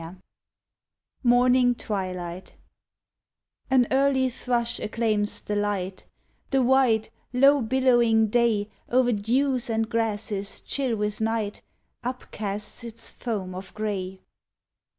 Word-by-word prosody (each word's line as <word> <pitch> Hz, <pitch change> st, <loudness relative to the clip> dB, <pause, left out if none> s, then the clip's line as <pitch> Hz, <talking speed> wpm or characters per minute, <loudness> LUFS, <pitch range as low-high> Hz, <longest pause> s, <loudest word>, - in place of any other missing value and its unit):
61 170 Hz, +3 st, -10 dB, 1.0 s
MORNING 245 Hz, 0 st, +4 dB
TWILIGHT 185 Hz, -4 st, -5 dB, 1.1 s
An 260 Hz, -2 st, +4 dB
early 265 Hz, -1 st, +3 dB
thrush 235 Hz, -1 st, -1 dB
acclaims 215 Hz, -1 st, -1 dB
the 210 Hz, -, -3 dB
light 200 Hz, -2 st, -2 dB, 0.2 s
— -, -, -42 dB
The 270 Hz, -2 st, +2 dB
wide, 245 Hz, -4 st, +3 dB, 0.2 s
low 275 Hz, +3 st, +5 dB
billowing 235 Hz, -2 st, +3 dB
day 220 Hz, -3 st, +2 dB, 0.2 s
O'er 250 Hz, 0 st, +4 dB
dews 245 Hz, +4 st, +1 dB
and 225 Hz, 0 st, 0 dB
grasses 210 Hz, -3 st, -2 dB
chill 265 Hz, -5 st, -1 dB
with 210 Hz, 0 st, -3 dB
night 220 Hz, -2 st, -1 dB, 0.4 s
Upcasts 210 Hz, -4 st, -5 dB
its 230 Hz, -1 st, -6 dB
foam 200 Hz, -6 st, -4 dB
of 185 Hz, +1 st, -8 dB
grey. 190 Hz, -3 st, -3 dB
225 Hz, 110 wpm, -25 LUFS, 205-250 Hz, 1.1 s, low